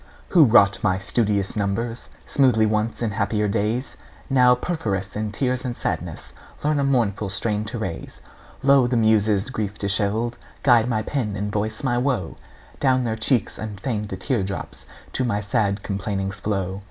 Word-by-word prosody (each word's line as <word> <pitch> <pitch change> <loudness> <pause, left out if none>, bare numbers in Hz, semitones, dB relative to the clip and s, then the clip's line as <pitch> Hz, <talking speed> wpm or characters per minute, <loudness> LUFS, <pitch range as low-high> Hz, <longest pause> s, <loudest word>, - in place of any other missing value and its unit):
Who 165 -5 +7
wrought 100 -4 +5
my 95 -3 +2
studious 100 0 0
numbers 115 +3 -2 0.2
Smoothly 125 -6 +3
once 110 +2 -1
in 110 - 0
happier 105 +1 0
days, 110 +6 -1 0.3
Now 125 -2 +6
perforce 110 - -3
in 105 0 -2
tears 125 +2 -1
and 125 -2 -4
sadness - - -4 0.3
Learn 150 0 +2
a - - +2
mournful 115 -7 +1
strain 105 +1 -1
to 115 +3 -5
raise. 95 -7 -5 0.4
Lo, 140 -2 +5
the 120 0 +1
Muses, 110 0 +2
grief 105 -4 -3
dishevelled, 105 +4 0 0.3
Guide 120 -3 +5
my 110 -2 0
pen 110 -6 -2
and 105 +1 -3
voice 110 +3 -2
my 120 -2 +1
woe; 125 - -1 0.4
Down 130 -2 +3
their 115 -2 -1
cheeks 110 0 0
unfeigned 105 0 -4
the 95 - -5
tear 120 +3 -1
drops 95 +1 -6 0.3
To 130 - 0
my 115 -5 0
sad 105 -1 0
complainings 100 -1 -3
flow! 95 -2 -2
110 Hz, 165 wpm, -23 LUFS, 100-125 Hz, 0.4 s, Who